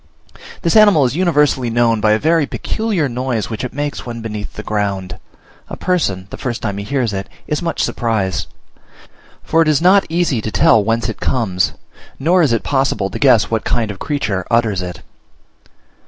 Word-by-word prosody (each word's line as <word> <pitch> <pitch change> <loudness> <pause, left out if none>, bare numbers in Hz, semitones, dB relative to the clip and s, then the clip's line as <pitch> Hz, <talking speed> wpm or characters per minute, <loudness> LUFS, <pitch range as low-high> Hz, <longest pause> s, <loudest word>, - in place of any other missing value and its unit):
This 170 - +1
animal 205 -10 +6
is 125 - -1
universally 150 -8 +2
known 115 -1 +2
by 105 0 +4
a - - +3
very 160 +3 +2
peculiar 215 -9 -1
noise 125 -3 -3
which 110 - -4
it 125 - -4
makes 145 +1 -4
when 120 -1 -6
beneath 105 -2 -6
the 105 - -7
ground. 100 -3 -3 0.5
A - - -6
person, 100 - -1
the - - -7
first 120 -4 -4
time 100 -3 -2
he - - -4
hears 120 -1 -1
it, 95 0 -4 0.2
is 150 - -2
much 170 -1 -1
surprised; 110 -6 -1 1.0
for 165 - +2
it 165 - +2
is 150 -2 +3
not 190 +3 +4
easy 165 -8 0
to 110 - -3
tell 110 0 +4
whence 115 +1 0
it 110 - -5
comes, 95 -8 0 0.4
nor 175 +6 +3
is 150 -7 +3
it 115 - 0
possible 135 -8 0
to - - -5
guess 125 -6 +4
what 115 -1 0
kind 115 -3 -1
of 95 - -10
creature 105 -11 -2
utters 110 -5 +1
it. 90 -1 -7
120 Hz, 185 wpm, -17 LUFS, 105-150 Hz, 1.0 s, animal